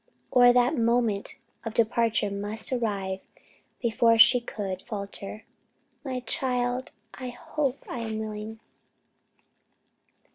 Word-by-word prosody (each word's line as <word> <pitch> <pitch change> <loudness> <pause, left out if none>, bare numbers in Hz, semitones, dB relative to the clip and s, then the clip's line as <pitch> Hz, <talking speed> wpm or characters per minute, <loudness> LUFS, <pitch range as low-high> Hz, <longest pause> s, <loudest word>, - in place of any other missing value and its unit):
or 245 -1 +7
that 245 0 +3
the - - -1
moment 230 -3 +1 0.3
of 225 -1 -5
departure 230 -2 +2
must 205 +4 -2
arrive, 200 -5 -2 0.6
before 230 0 +4
she 240 +2 +8
could 195 -5 -5
falter, 200 +1 -7 0.6
"My 255 -3 -3
child, 250 0 0 0.2
I 255 -1 -6
hope 275 +2 -3
I 245 - -5
am 220 -1 -3
willing?" 215 0 -6
230 Hz, 110 wpm, -27 LUFS, 210-245 Hz, 0.6 s, she